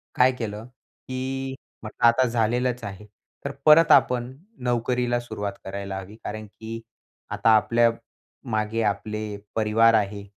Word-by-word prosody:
काय 125 +1 +5
केलं, 110 -1 -5
की 130 +1 -6 0.3
म्हटलं 110 +2 -2
आता 115 +2 +4
झालेलंच 120 +2 0
आहे, 100 0 -7 0.4
तर 140 - -2
परत 155 +1 +7
आपण 125 0 +4 0.3
नोकरीला 120 0 0
सुरुवात 105 -4 -5
करायला 95 0 -5
हवी, 95 +3 -11
कारण 110 +1 -5
की 115 +2 -8 0.5
आता 115 - +1
आपल्या 115 +2 +4 0.6
मागे 110 +1 -1
आपले 105 0 -2 0.2
परिवार 115 +1 +4
आहे 100 -1 0
115 Hz, 125 wpm, -24 LUFS, 105-125 Hz, 0.6 s, परत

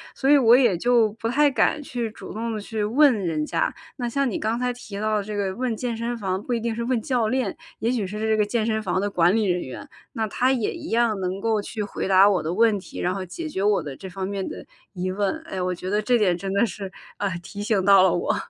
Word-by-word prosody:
所 270 - 0
以 290 - +8
我 240 -1 +7
也 240 -8 +4
就 230 +1 +3
不 225 +1 -3
太 290 +4 +4
敢 295 +3 +2
去 240 -4 -3
主 - - -10
动 230 +2 -3
地 215 - -3
去 215 0 -3
问 265 +6 +5
人 155 -3 -1
家。 - - 0 0.2
那 240 -2 -2
像 275 +1 0
你 215 - -2
刚 225 +3 -1
才 250 0 0
提 210 -4 -8
到 215 0 +1
的 205 - -1
这 210 0 -6
个 190 -2 -1
问 245 0 -1
健 240 -1 -2
身 235 +1 -3
房 190 -3 -2
不 250 - -3
一 235 - 0
定 230 0 -2
是 235 - -3
问 245 -1 0
教 240 -2 0
练， 250 -3 -1 0.2
也 230 - 0
许 235 -5 -1
是 210 +2 -6
这 220 0 +1
个 210 - +3
健 220 +1 -1
身 220 -1 0
房 185 -1 0
的 205 +1 -1
管 180 +1 +3
理 220 -2 +2
人 180 -1 +1
员， 205 - -8 0.3
那 225 -3 -1
他 250 +5 +1
也 245 -5 0
一 - - -8
样 225 -3 +2
能 185 +1 -2
够 220 0 +1
去 210 +1 -5
回 200 - -4
答 195 +1 +6
我 190 -5 +1
的 160 - -2
问 220 0 +3
题， - - -10
然 180 - 0
后 195 0 -4
解 315 - -6
决 195 -10 -3
我 205 0 +2
的 140 -3 -6
这 190 +4 -9
方 190 +1 -4
面 195 -1 -3
的 - - -8 0.3
疑 185 0 -2
问。 205 +11 -1
哎， 190 -1 -4
我 180 0 0
觉 180 +1 -6
得 210 +2 +1
这 245 +3 +3
点 190 -6 +2
真 195 +1 -4
的 200 +4 +3
是， 195 -3 -6 0.3
呃， 200 - -1
提 205 +3 -8
醒 205 -3 +1
到 195 -1 +7
了 190 - +4
我。 175 - 0
215 Hz, 295 characters per minute, -24 LUFS, 195-235 Hz, 0.3 s, 以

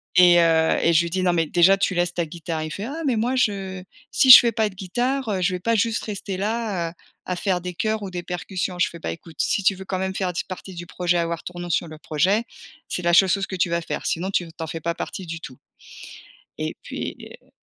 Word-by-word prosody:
et 175 -1 +7
heu, 160 -1 +3
et 170 - +4
je 165 +1 +5
lui 170 - -3
dit: 185 +1 -1
«Non, 180 - +3
mais 165 -2 +1
déjà, 175 +5 +4
tu 195 -1 0
laisses 175 0 0
ta 170 -1 -1
guitare». 165 0 -5
Il 155 - -6
fait: 195 - -5
«Ah 300 +6 -5
mais 255 - +2
moi, 240 +4 0
je 195 -5 -1 0.3
si 265 - +3
je 250 - +14
fais 235 - +1
pas 220 0 +1
de 200 - -9
guitare, 245 +7 -2
heu, 190 -3 -1
je 180 +1 +1
vais 180 - -4
pas 230 +3 +1
juste 225 +1 0
rester 200 -2 -5
là, 205 -4 -2
heu, - - -18 0.3
à 180 - -2
faire 185 -3 0
de 180 - -5
choeurs 215 -1 -1
ou 195 - -5
des 180 - -4
percussions». 180 +1 -4
Je - - +3
fais: 170 - -11
«Bah, - - -4
écoute, 165 -1 -11
si 200 - +1
tu 195 - +4
veux 190 0 -10
quand 185 -1 -3
même 190 0 -2
faire 185 -2 -1
d 175 - -3
partie 185 0 -8
du 175 0 -7
projet, 175 0 0
avoir 170 0 -2
ton 175 0 -8
nom 175 - -5
sur 170 +1 0
le 155 0 -10
projet, 185 +9 +1 0.5
c’est 180 - -3
la 175 0 +2
seule 190 +2 +6
chose 195 +1 0
que 190 - -5
tu 180 -1 +1
vas 170 0 0
faire - - -5
sinon 185 +4 -1
tu 185 - +1
n 165 - -10
tu 165 0 -7
en - - -5
fais 165 +1 -6
pas 170 +1 -2
partie 190 - -6
du 165 0 -6
tout» 135 -6 -10 1.0
et - - -3
puis - - -5 0.3
heu - - -29
180 Hz, 275 wpm, -23 LUFS, 170-200 Hz, 1.0 s, je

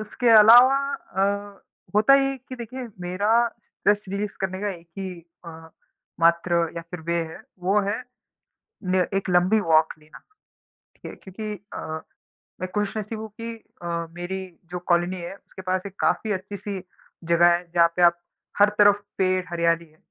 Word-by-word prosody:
उसके 235 +3 -1
अलावा 240 +5 +8 0.2
अ, 200 +1 -3 0.3
होता 215 +6 +6
है 275 0 +3
ये 270 - -5
कि 255 - -6
देखिए 245 +1 -7
मेरा 205 +7 +2
स्ट्रेस 210 -2 -1
रिलीज़ 200 +1 -2
करने 190 0 -3
का 210 - -2
है 175 -4 -6
कि 175 0 -8 0.2
अ, 170 - -8 0.7
मात्र 170 0 +3
या 170 - -4
फिर 180 - -6
वे 170 +1 -2 0.2
है, - - -10 0.2
वो 195 +4 +2
है 210 +4 -1 0.9
ने 185 - +3 0.2
एक 195 - -4
लंबी 180 +5 +4
वॉक 160 -3 +3
लेना, 155 0 -16 0.8
ठीक - - -10
है? - - -9
क्योंकि 210 +2 -7 0.2
अ, - - -5 0.8
मैं 185 - -2
खुश 210 +1 -1
नसीब 215 +1 -4
हूँ 220 0 -7
कि 230 0 -4 0.3
अ, 170 -1 -3
मेरी 180 +2 -4 0.3
जो 180 - -3
कॉलोनी 175 +1 +2
है 170 +3 -6
उसके 190 - -13
पास 185 0 -1
एक 195 - -12
काफ़ी 220 - +1
अच्छी-सी 200 +1 -5 0.5
जगह 170 0 +5
है 175 - -4
जहाँ 170 -1 +6
पे 180 - 0
आप 170 0 +5 0.4
हर 205 - +7
तरफ 205 0 +5
पेड़ 185 -1 +1
हरियाली 170 -1 +1
है। 155 0 -26
190 Hz, 170 wpm, -24 LUFS, 175-210 Hz, 0.9 s, अलावा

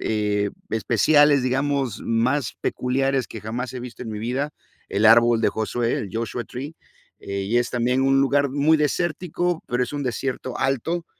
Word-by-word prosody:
eh, 105 -1 0 0.2
especiales, 140 +6 +4
digamos, 135 -2 -1
más 125 +5 0
peculiares 135 +1 0
que 110 - -8
jamás 120 +4 -4
he 125 - -4
visto 125 0 -8
en 120 - -7
mi 105 - -5
vida, 130 +6 -2 0.4
el 105 +2 +2
árbol 115 0 +6
de - - +4
Josué, 115 +2 -1
el 100 - -3
Joshua 115 +1 -3
Tree, 140 +6 -7 0.5
eh, 100 0 -4
y 110 +5 -1
es 120 - -1
también 125 +2 +1
un 135 0 +3
lugar 140 +1 +2
muy 145 +3 +3
desértico, 175 +3 -1
pero 125 0 0
es - - -9
un 145 - -3
desierto 130 0 -3
alto, 135 +6 -1
125 Hz, 170 wpm, -23 LUFS, 115-140 Hz, 0.5 s, árbol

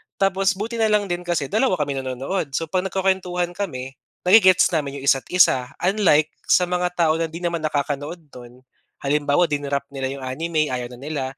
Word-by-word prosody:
tapos, 195 0 +1
buti 225 +4 -4
na 220 - +3
lang 210 -3 +1
din 175 0 -4
kasi 155 -6 -1
dalawa 220 -1 +2
kami 150 -4 -2
nanonood. 135 +4 -3
So, 165 +1 -3
'pag 185 0 0
nagkukuwentuhan 185 -2 -1
kami 135 -9 -6 0.2
na-ge-gets 185 -1 +6
namin 140 -4 -2
'yong 135 - -8
isa't 135 - -1
isa. 130 -8 +4 0.2
Unlike, 180 -6 +3 0.2
sa 180 - +4
mga 180 0 -1
tao 165 -2 +2
na 165 - 0
'di 165 +2 -9
naman 170 -1 -1
nakakanood 150 +2 -3
no'n. 125 +1 -13 0.4
Halimbawa, 145 +4 +2
di-nrop 140 -1 -1
nila 135 -1 -3
'yong 135 - -9
anime, 155 +3 -1
ayaw 125 -1 -3
na - - -16
nila, 145 0 -4
165 Hz, 185 wpm, -22 LUFS, 140-185 Hz, 0.4 s, na-ge-gets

